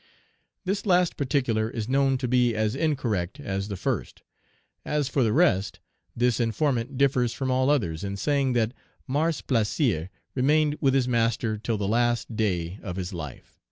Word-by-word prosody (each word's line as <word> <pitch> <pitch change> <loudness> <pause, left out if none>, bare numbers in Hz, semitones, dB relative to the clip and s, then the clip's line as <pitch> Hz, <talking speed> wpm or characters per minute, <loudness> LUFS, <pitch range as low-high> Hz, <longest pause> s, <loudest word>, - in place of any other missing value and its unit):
This 200 +3 -2
last 180 -2 +3
particular 125 -6 0
is 115 -2 -4
known 135 0 +2
to 125 -1 -2
be 120 -1 +2
as 110 0 0
incorrect 130 - -1
as 100 -8 -3
the 100 -2 -5
first. - - -3 0.6
As 150 -2 0
for 140 - 0
the 115 -3 +3
rest, 105 - +2 0.4
this 120 -1 +2
informant 125 +2 0
differs 125 -4 +2
from 130 +1 -2
all 130 +1 +2
others 100 - 0
in 100 0 -3
saying 140 +3 +1
that 115 -1 +1 0.3
Mars 150 +3 0
Plaisir 110 - 0 0.2
remained 150 +3 +2
with 135 -2 +3
his 130 -2 +2
master 115 -2 +1
till 110 +1 -2
the 100 -1 -2
last 120 +1 +1
day 95 -3 -1
of 90 -4 -5
his 95 0 -4
life. 75 -7 -8
120 Hz, 165 wpm, -26 LUFS, 105-140 Hz, 0.6 s, last